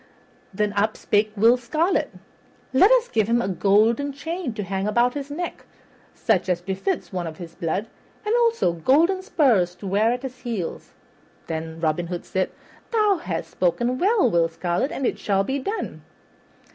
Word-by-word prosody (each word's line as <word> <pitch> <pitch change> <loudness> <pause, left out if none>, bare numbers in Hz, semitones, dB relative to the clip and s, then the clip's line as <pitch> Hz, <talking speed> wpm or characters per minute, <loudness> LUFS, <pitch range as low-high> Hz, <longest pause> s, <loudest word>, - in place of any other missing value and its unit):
Then 210 +1 -1
up 210 +2 +1
spake 210 +1 +1
Will 230 +4 +5
Scarlet, 310 +10 0 0.6
"Let 365 +11 +6
us - - +4
give 220 -3 +1
him 235 +1 +3
a 215 - -1
golden 210 - +2
chain 325 +1 -4
to 210 - -3
hang 195 +1 -2
about 240 +3 +2
his 285 -1 -5
neck, 345 +5 -5 0.5
such - - +1
as 180 -1 +1
befits 195 - -3
one 180 -2 -2
of 155 -1 -7
his 170 -2 -9
blood, 175 +6 -2 0.4
and 425 - +1
also 460 - +2
golden 315 - +3
spurs 240 - +2
to 200 - -11
wear 205 +4 +2
at 250 +2 -3
his 255 -1 -7
heels." 225 -9 -5 0.5
Then 160 0 -5
Robin 165 +1 0
Hood 175 0 -5
said, 185 0 -1 0.4
"Thou 425 -4 +3
hast 170 - -4
spoken 240 +8 0
well, 415 +2 +3
Will 170 -1 +2
Scarlet, 175 - -1
and 270 - -3
it - - -1
shall 195 -1 +1
be 265 +7 -2
done." 405 +11 -4
220 Hz, 170 wpm, -23 LUFS, 185-285 Hz, 0.6 s, Let